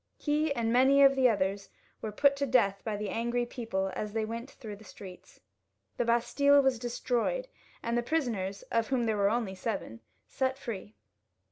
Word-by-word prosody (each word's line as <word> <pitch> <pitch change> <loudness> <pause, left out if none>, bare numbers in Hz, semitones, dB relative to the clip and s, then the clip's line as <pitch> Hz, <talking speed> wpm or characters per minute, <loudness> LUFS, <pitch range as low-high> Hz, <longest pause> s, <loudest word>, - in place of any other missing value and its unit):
He 300 0 0
and 230 -1 0
many 270 +3 +6
of 275 0 +6
the 260 -2 +5
others 195 -2 -1 0.3
were 215 - -4
put 280 +6 +3
to 280 0 -1
death 215 -6 +2
by 215 -2 -2
the 210 -1 -4
angry 240 +1 -1
people 210 -6 -3
as 210 -1 -4
they 220 -1 0
went 230 +4 -6
through 215 -7 -9
the 215 - -15
streets. 190 -3 -12 0.6
The 240 - 0
Bastille 280 +5 +4
was 265 -3 +2
destroyed, 245 - -1 0.4
and 235 0 -1
the 240 - +2
prisoners, 235 -9 -2
of 230 -1 +1
whom 260 -3 0
there 220 -2 0
were 200 0 +3
only 225 -3 -1
seven, 185 - -4 0.3
set 265 0 -1
free. 215 -5 -7
235 Hz, 180 wpm, -30 LUFS, 210-265 Hz, 0.6 s, many